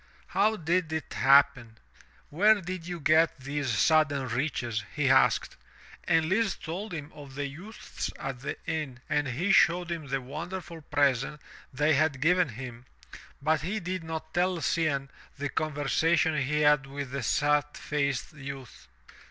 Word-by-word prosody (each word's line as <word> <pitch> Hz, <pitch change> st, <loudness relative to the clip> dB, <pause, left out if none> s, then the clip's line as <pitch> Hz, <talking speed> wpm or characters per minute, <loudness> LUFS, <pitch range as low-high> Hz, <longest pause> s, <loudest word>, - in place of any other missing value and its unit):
"How 215 Hz, +3 st, +2 dB
did 170 Hz, -2 st, 0 dB
it 160 Hz, 0 st, -4 dB
happen? 135 Hz, -4 st, +4 dB, 0.5 s
Where 210 Hz, +7 st, +5 dB
did 180 Hz, -2 st, -6 dB
you 175 Hz, -1 st, -5 dB
get 160 Hz, +3 st, +3 dB
these 140 Hz, +1 st, -3 dB
sudden 140 Hz, +3 st, +2 dB
riches?" 120 Hz, -3 st, -2 dB
he 145 Hz, -3 st, +2 dB
asked, 125 Hz, -3 st, +3 dB, 0.5 s
and 160 Hz, -1 st, +2 dB
Lise 205 Hz, +2 st, +1 dB
told 185 Hz, +7 st, -6 dB
him 155 Hz, -3 st, -6 dB
of 145 Hz, -3 st, -12 dB
the 145 Hz, 0 st, -2 dB
youths 175 Hz, +11 st, -7 dB
at 135 Hz, -2 st, -5 dB
the 135 Hz, -, -5 dB
inn 145 Hz, -6 st, -4 dB
and 150 Hz, -2 st, 0 dB
he 160 Hz, +11 st, 0 dB
showed 175 Hz, -2 st, +4 dB
him 160 Hz, -4 st, -4 dB
the 135 Hz, 0 st, -1 dB
wonderful 165 Hz, +5 st, -7 dB
present 145 Hz, -1 st, +1 dB, 0.3 s
they 150 Hz, +4 st, +2 dB
had 145 Hz, -1 st, +2 dB
given 175 Hz, +2 st, +3 dB
him, 120 Hz, +1 st, -8 dB, 0.6 s
but 155 Hz, -1 st, +2 dB
he 195 Hz, +8 st, -2 dB
did 185 Hz, -1 st, -4 dB
not 160 Hz, -1 st, -6 dB
tell 180 Hz, 0 st, +1 dB
Cianne 140 Hz, -3 st, 0 dB, 0.3 s
the 145 Hz, +1 st, -3 dB
conversation 155 Hz, +2 st, +1 dB
he 150 Hz, +1 st, 0 dB
had 150 Hz, -2 st, +4 dB
with 140 Hz, -1 st, -6 dB
the 140 Hz, 0 st, -3 dB
sad 145 Hz, +4 st, +2 dB
faced 140 Hz, -3 st, -2 dB
youth. 135 Hz, -, -9 dB
150 Hz, 150 wpm, -28 LUFS, 135-165 Hz, 0.6 s, Where